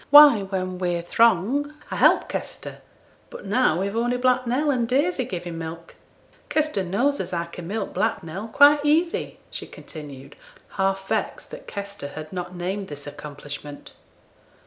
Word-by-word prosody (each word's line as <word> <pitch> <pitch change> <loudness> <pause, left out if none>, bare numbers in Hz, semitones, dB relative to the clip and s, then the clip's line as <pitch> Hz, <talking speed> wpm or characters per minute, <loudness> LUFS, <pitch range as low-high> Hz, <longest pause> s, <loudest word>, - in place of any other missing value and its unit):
'Why, 290 -6 +9
when 185 -2 -3
we're 175 -2 -1
throng, 235 - +2 0.2
I - - -2
help - - +5
Kester; - - -6 0.5
but - - -10
now 200 -5 +2
we've 200 +2 -2
only 240 +2 +1
Black 255 0 +2
Nell 285 +5 +2
and 240 -4 0
Daisy 275 +2 +1
giving 175 -6 -5
milk. 165 +1 -7 0.6
Kester 305 -10 +1
knows 245 +11 +1
as 185 -1 -4
I 170 0 -1
can 170 0 -9
milk 220 +4 -3
Black 220 -3 0
Nell 185 +7 -6
quite 285 +5 +6
easy,' 325 +4 +1
she - - -6
continued, 140 -4 -10 0.3
half 195 0 -1
vexed - - -2
that - - -10
Kester 200 -6 -5
had 155 +3 -8
not 180 0 -5
named 190 +3 -3
this 145 -1 -8
accomplishment. 145 0 -8
195 Hz, 155 wpm, -24 LUFS, 170-255 Hz, 0.6 s, Why